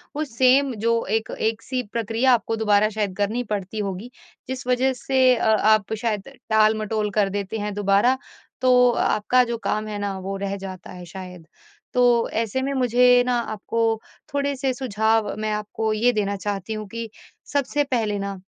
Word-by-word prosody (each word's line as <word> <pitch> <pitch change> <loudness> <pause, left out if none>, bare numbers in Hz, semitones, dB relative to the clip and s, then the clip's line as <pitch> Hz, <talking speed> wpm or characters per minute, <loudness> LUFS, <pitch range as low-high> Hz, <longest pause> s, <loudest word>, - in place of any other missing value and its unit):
वो 305 - -1
सेम 260 +1 +3
जो 230 0 +2
एक 220 - -11
एक-सी 225 +3 -1
प्रक्रिया 230 +3 +2
आपको 225 -1 0
दोबारा 215 -1 +3
शायद 210 -3 -3
करनी 215 +4 0
पड़ती 200 +1 -4
होगी, 200 +3 -4 0.4
जिस 255 -1 -5
वजह 255 +1 +2
से 255 0 +3
अ, - - -2
आप 215 -1 +3
शायद 215 -3 -2 0.2
टाल-मटोल 215 0 +2
कर 200 -1 +3
देते 200 +2 -3
हैं 210 0 -3
दोबारा, 205 +5 +3 0.4
तो 250 -1 +5
आपका 245 +2 +2
जो 235 -1 -3
काम 215 0 -1
है 210 - -4
ना 200 -1 -3
वो 195 +1 -4
रह 200 0 -3
जाता 190 -2 -8
है 180 -1 -9
शायद। 180 -2 -10 0.5
तो 245 -2 +3
ऐसे 225 +3 -1
में 275 +1 -2
मुझे 250 -1 +4
ना 250 0 +1 0.2
आपको 215 +2 -4 0.5
थोड़े-से 280 -2 0
सुझाव 220 -4 0
मैं 215 0 -1
आपको 210 +1 -2
ये 235 +3 +3
देना 200 -2 -1
चाहती 200 +1 -4
हूँ 215 -1 -5
कि 230 +2 -6 0.4
सबसे 290 +1 +1
पहले 225 -7 -1
ना, 200 -1 -4
220 Hz, 170 wpm, -23 LUFS, 205-250 Hz, 0.5 s, तो